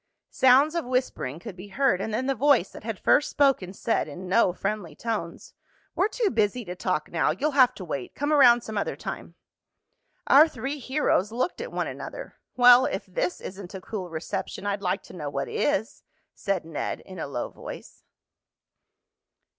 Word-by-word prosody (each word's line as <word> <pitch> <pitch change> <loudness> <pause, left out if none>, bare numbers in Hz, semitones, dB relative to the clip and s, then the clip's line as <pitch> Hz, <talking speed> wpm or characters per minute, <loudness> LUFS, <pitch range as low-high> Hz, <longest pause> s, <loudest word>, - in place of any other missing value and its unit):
Sounds 265 +4 +5
of 340 - -1
whispering 250 - -2
could 185 +3 -9
be 185 +2 -10
heard, 205 -2 +1
and 220 - -3
then 235 +5 -1
the 270 - +1
voice 265 -6 +3
that - - -11
had 225 -2 -4
first 290 - +3
spoken 270 -10 +2
said 215 0 -1
in 175 +5 -8
no 190 0 +3
friendly 195 -1 -4
tones: 215 -7 -5 0.4
"We're 385 - +2
too 435 -2 -1
busy 215 +2 0
to 180 0 -6
talk 180 -4 -2
now. 165 - +1
You'll 240 - 0
have 255 -3 +5
to 185 - -8
wait. 140 -6 -5
Come 290 +2 0
around 245 -5 +7
some 220 -2 -4
other - - -2
time." - - -7 0.9
Our 295 +4 +7
three 285 -1 -5
heroes 260 -6 0
looked 255 - -2
at - - -6
one - - -1
another. - - -8 0.2
"Well, 245 +1 +7
if 190 - -4
this 180 -1 -2
isn't 190 0 -8
a 190 - -7
cool 185 -3 -6
reception 180 +4 -5
I'd 200 0 -1
like 180 -2 -1
to - - -14
know 150 -5 -5
what 140 -1 -3
is," 220 +8 -1 0.3
said 195 -4 -2
Ned 160 -3 -4
in 185 -2 -11
a - - -3
low 130 -3 -4
voice. - - -10
210 Hz, 185 wpm, -26 LUFS, 180-260 Hz, 0.9 s, around